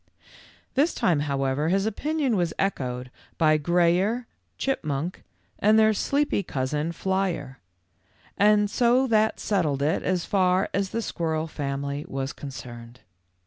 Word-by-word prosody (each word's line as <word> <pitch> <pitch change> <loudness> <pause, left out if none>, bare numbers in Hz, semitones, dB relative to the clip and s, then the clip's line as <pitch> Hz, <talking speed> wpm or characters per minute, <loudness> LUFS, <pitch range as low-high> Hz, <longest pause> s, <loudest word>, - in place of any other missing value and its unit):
This 295 +5 +2
time, 165 -5 +2
however, 140 +1 0
his 195 +2 +2
opinion 280 +3 0
was 175 -4 0
echoed 125 -9 -2 0.3
by 155 -2 +4
Grayer, 175 +9 +2 0.3
Chipmunk, 165 - -2 0.4
and 215 +2 +4
their 220 0 +5
sleepy 285 +2 0
cousin, 150 +1 -2
Flyer; 180 -7 -2 1.1
so 245 +5 +3
that 220 -3 +2
settled 155 -9 0
it 155 +3 +1
as 180 -2 -1
far 185 -1 +2
as 200 -1 0
the 230 +3 -3
squirrel 160 -4 -2
family 140 -1 -4
was 135 0 -4
concerned. 125 -3 -9
170 Hz, 120 wpm, -25 LUFS, 140-205 Hz, 1.1 s, their